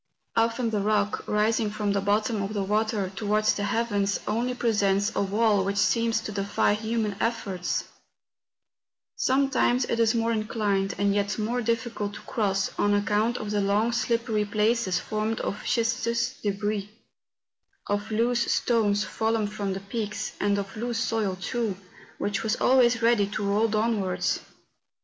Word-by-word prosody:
Often 230 +1 +1
the 210 - 0
rock, 210 0 0
rising 215 +1 +1
from 210 -1 -1
the 200 0 +1
bottom 210 +2 +1
of 200 +2 -4
the 200 - 0
water 210 -1 0
towards 215 +1 +2
the 205 - -2
heavens, 205 -2 0
only 240 +4 -1
presents 205 -4 +1
a - - +1
wall 205 0 +2
which 200 +1 -2
seems 230 +2 +2
to 220 - -5
defy 200 0 +1
human 220 -1 -1
efforts; 210 -6 -1 1.3
sometimes 260 -2 +2
it 230 - -2
is 230 0 +3
more 230 0 +1
inclined, 210 -3 0
and 200 0 +2
yet 205 0 0
more 230 +3 -1
difficult 230 -3 -2
to - - -9
cross, 195 -3 -1
on 205 0 +3
account 210 +3 +1
of 210 -1 -5
the 205 -1 +1
long 205 +4 +2
slippery 230 -2 0
places 210 -1 +1
formed 215 +1 -2
of 200 - -3
schistose 235 +1 0
debris^ 205 0 -1 1.0
of 205 +1 -2
loose 235 +2 +1
stones 210 -4 +2
fallen 220 +2 0
from 205 -2 -3
the 190 - -5
peaks, 210 +1 -4
and 205 0 +1
of 200 0 -4
loose 235 +1 -3
soil, 220 -5 -1
too, 220 -1 -2 0.4
which 205 +1 -1
was 220 0 0
always 245 -3 +3
ready 230 -4 +4
to 205 +1 -4
roll 205 +3 +2
downwards. 210 -5 0
215 Hz, 155 wpm, -26 LUFS, 205-230 Hz, 1.3 s, ready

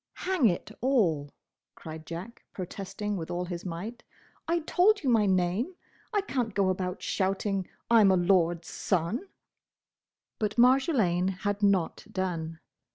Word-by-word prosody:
"Hang 365 -10 +3
it 175 -4 -1
all!" 185 - +2 0.5
cried 160 0 -9
Jack, 180 +8 -7
protesting 200 +2 -4
with 165 -2 -5
all 175 +1 -2
his 175 -1 -5
might, 190 +7 -6 0.5
"I 335 +1 +1
told 390 +6 +3
you 260 - +2
my 215 -3 +4
name! 190 - +1 0.4
I 415 -2 +2
can't 245 - -2
go 195 -2 +3
about 185 -1 -2
shouting 195 0 -1 0.2
I 230 -1 +6
'm 200 - +6
a 190 - +4
lord's 175 -2 +2
son!" 190 - -1 1.1
But 215 +1 -1
Marjolaine 240 - +4
had 205 0 -1
not 195 -5 +1
done. 165 -4 -3
195 Hz, 140 wpm, -28 LUFS, 175-235 Hz, 1.1 s, I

